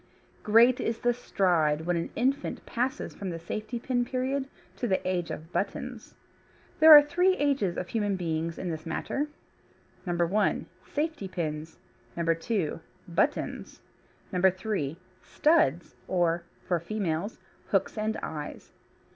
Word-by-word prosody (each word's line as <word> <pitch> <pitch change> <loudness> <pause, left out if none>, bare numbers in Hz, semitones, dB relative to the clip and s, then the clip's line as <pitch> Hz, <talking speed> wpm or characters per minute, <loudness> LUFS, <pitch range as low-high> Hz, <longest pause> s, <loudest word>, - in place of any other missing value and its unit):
Great 235 +4 +5
is 225 0 -1
the 240 +1 +2
stride 170 -10 +1
when 175 +2 0
an 170 - -2
infant 270 +4 -1
passes 260 +4 -2
from 195 - -5
the 170 - -4
safety 215 +8 -5
pin 245 +1 0
period 260 +2 -1 0.3
to 245 - -2
the 190 -3 0
age 180 -2 -1
of 160 +3 -7
buttons. - - -4 0.6
There 315 0 +9
are 295 - +8
three 360 +5 +2
ages 275 -11 +1
of 180 - -4
human 205 -3 0
beings 165 -2 -2
in 180 - -3
this 160 +1 -6
matter: 275 - -2 0.8
(1) 175 +3 +1 0.3
Safety 305 -8 -2
pins, 160 -3 -4 0.4
(2) 165 +2 0 0.3
Buttons, 170 - -1 0.5
(3) 185 -4 +1 0.2
Studs, 175 - +2
or 170 -2 +1 0.2
(for 175 -2 +1
females) 190 +1 -2 0.3
Hooks 195 -1 +1
and 215 0 -1
Eyes. 150 -2 -6
190 Hz, 130 wpm, -28 LUFS, 170-245 Hz, 0.8 s, There